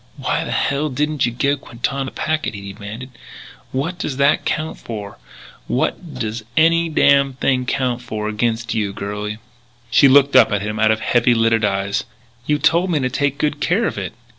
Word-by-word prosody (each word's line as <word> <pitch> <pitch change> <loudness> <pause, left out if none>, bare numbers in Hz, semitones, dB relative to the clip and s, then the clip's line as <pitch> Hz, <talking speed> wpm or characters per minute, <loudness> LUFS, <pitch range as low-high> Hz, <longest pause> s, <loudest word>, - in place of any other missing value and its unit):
"Why - - -1
the - - -6
hell 140 +2 0
didn't 150 0 0
you - - -2
give 140 +4 0
Quintana 135 +3 -3
the 130 - -6
packet?" 155 -6 -2
he 100 -1 -8
demanded. 110 +6 -8 0.6
"What 165 +7 -3
does 135 -6 -3
that 140 +1 +3
count 155 0 -2
for 105 -3 -7 0.5
what 160 -6 -2
does 115 -2 -4
any 165 +1 +4
damn 140 -3 +4
thing 130 -1 0
count 125 -3 -1
for 110 -3 -4
against 115 +2 -1
you, 105 -3 -1
girlie?" 105 +1 -4 0.5
She 140 - +6
looked 140 0 +5
up 130 - +7
at 105 0 0
him 105 +1 -4
out 110 0 +4
of 110 0 +1
heavy 120 +1 +3
lidded 115 -1 +2
eyes: 100 -1 0 0.4
"You 150 - +2
told 170 +5 +2
me 165 - +1
to 130 -2 -1
take 145 +1 0
good 150 -1 -1
care 195 +10 +1
of - - -2
it." - - -5
130 Hz, 190 wpm, -19 LUFS, 110-145 Hz, 0.6 s, up